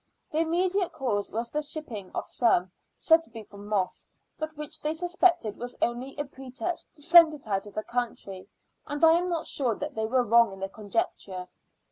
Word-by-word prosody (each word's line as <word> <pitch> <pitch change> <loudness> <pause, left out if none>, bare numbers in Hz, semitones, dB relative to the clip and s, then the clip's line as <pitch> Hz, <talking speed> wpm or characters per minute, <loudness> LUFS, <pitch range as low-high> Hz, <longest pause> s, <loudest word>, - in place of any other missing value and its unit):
The 310 - 0
immediate 360 +3 +1
cause 210 -6 -1
was 230 +2 -3
the 300 - 0
shipping 290 -10 -5
of - - -2
some, 185 -7 +2 0.2
said 325 0 +4
to - - -17
be 225 -1 -8
for 200 -1 -14
Moss, 205 -2 -2 0.3
but 310 0 -5
which 300 +1 -6
they 305 +1 0
suspected 345 - +2
was 245 0 -7
only 250 +4 -2
a 290 - -1
pretext 270 +6 -6
to 295 - -11
send 330 -1 +8
it 285 - -13
out 195 0 -1
of 205 - -13
the 215 - -2
country, 230 -6 -4 0.4
and 290 +2 +2
I 320 - +8
am 350 +2 +2
not 335 -2 -1
sure 245 -6 +1
that 295 +5 -5
they 220 -2 -1
were 255 +2 +3
wrong 235 -1 +5
in 195 - -10
their 195 0 -3
conjecture. 195 -3 -3
255 Hz, 200 wpm, -28 LUFS, 215-315 Hz, 0.4 s, send